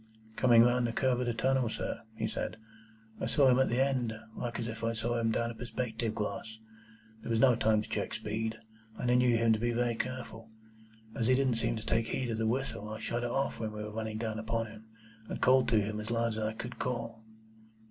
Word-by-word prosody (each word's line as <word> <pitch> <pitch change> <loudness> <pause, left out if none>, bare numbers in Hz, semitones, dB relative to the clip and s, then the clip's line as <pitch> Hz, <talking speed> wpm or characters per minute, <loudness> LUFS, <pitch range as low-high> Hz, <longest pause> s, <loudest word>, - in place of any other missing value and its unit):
"Coming 120 -3 +6
round 120 0 +3
the 115 - -3
curve 125 0 +2
in 125 - -1
the 120 - +1
tunnel, 130 0 +2
sir," - - -4
he 110 - -2
said, 110 - -3 0.6
"I - - -1
saw 140 -3 +4
him 125 0 +5
at 130 - +3
the 120 - +1
end, 130 -4 +1 0.2
like 120 -1 -4
as 115 - -2
if 115 0 -6
I 115 0 +1
saw 115 +1 -1
him 115 -1 +1
down 115 +1 0
a - - -7
perspective 115 -2 -3
glass. 110 +1 -4 0.6
There - - -7
was 115 -1 +2
no 125 -1 +6
time 110 -1 +2
to - - -10
check - - -2
speed, 110 +1 -3 0.4
and 125 - 0
I - - +5
knew 125 -1 +4
him 115 0 +4
to 110 - 0
be 120 +1 0
very 120 0 +1
careful. 115 -2 -5 0.6
As 115 - 0
he 130 - +5
didn't 130 -3 +2
seem - - 0
to 110 - -6
take 115 0 +1
heed 125 0 -2
of 110 - -2
the 110 - +1
whistle, 115 -3 -2
I 110 0 -5
shut 120 +2 -2
it 120 - -1
off 135 +3 -1
when 110 -1 -3
we 105 0 -5
were 105 0 -6
running 110 -1 -3
down 110 -1 -3
upon 115 +1 -1
him, 110 0 -12 0.4
and - - -4
called 130 0 +5
to 115 -2 +4
him 105 +1 -2
as 110 - -5
loud 115 0 +1
as 110 -1 -3
I 110 0 -1
could 120 +3 -7
call." 115 -2 -3
115 Hz, 240 wpm, -31 LUFS, 110-125 Hz, 0.6 s, Coming